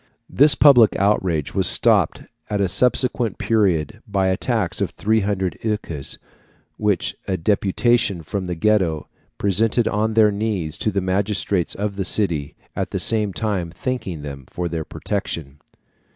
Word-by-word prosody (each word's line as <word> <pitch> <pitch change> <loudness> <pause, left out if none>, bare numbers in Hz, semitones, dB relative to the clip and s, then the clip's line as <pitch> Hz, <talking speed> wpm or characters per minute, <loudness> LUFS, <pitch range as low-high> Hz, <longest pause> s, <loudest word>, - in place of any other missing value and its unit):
This 145 +1 +6
public 125 -7 +6
outrage 95 -7 0
was - - +3
stopped - - +4 0.3
at 105 - -1
a 100 - +2
subsequent 125 +1 +2
period 105 -1 0
by 95 -2 0
a 95 - +1
tax 110 -4 -1
of - - 0
300 100 -5 -1
écus, 105 -10 -4 0.6
which 105 -3 -1
a 95 - -1
deputation 100 +1 +1
from 95 +4 -4
the 90 -1 -4
Ghetto 90 -5 0 0.3
presented 110 +4 +1
on 110 +1 -1
their 110 -2 +5
knees 100 -7 -3
to - - 0
the 100 -1 -1
magistrates 95 -1 -1
of 100 0 -4
the 95 - -2
city, 85 -9 0 0.2
at - - -3
the - - -3
same 105 -3 +2
time 95 -4 -2
thanking 90 - -5
them 70 -2 -8
for 90 0 -4
their 80 -2 -4
protection. 75 -3 -5
100 Hz, 150 wpm, -21 LUFS, 85-110 Hz, 0.6 s, This